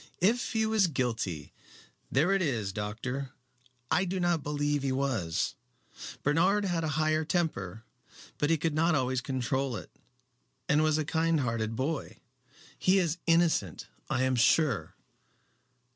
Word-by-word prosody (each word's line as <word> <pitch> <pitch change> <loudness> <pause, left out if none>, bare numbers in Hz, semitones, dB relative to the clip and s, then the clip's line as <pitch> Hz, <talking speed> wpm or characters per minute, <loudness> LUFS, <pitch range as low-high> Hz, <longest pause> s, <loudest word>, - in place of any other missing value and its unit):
"If 225 +9 +1
he 220 -1 +2
was 220 -3 +3
guilty. 115 - -2 0.6
There 155 +8 +3
it 195 -1 +2
is, 115 - -1
doctor. 120 +6 -4 0.6
I 185 - +3
do 190 0 -2
not 175 -3 +1
believe 145 0 -1
he 135 -1 -1
was. 130 -12 -1 0.7
Bernard 180 +8 +3
had 175 -3 0
a - - 0
high 155 0 +2
temper, 115 - -2 0.6
but 145 - +1
he 165 - +3
could 160 +1 -1
not 165 +2 +2
always 130 -1 0
control 130 0 -1
it, - - -8 0.8
and 150 +1 +3
was 155 -1 +3
a 155 - -1
kind 160 0 +1
hearted 115 -3 -2
boy. 140 +5 -3 0.6
He 185 +1 +4
is 175 -2 0
innocent 165 - +2 0.2
I 130 - +1
am 130 0 +2
sure." 125 - +2
145 Hz, 145 wpm, -29 LUFS, 125-165 Hz, 0.8 s, He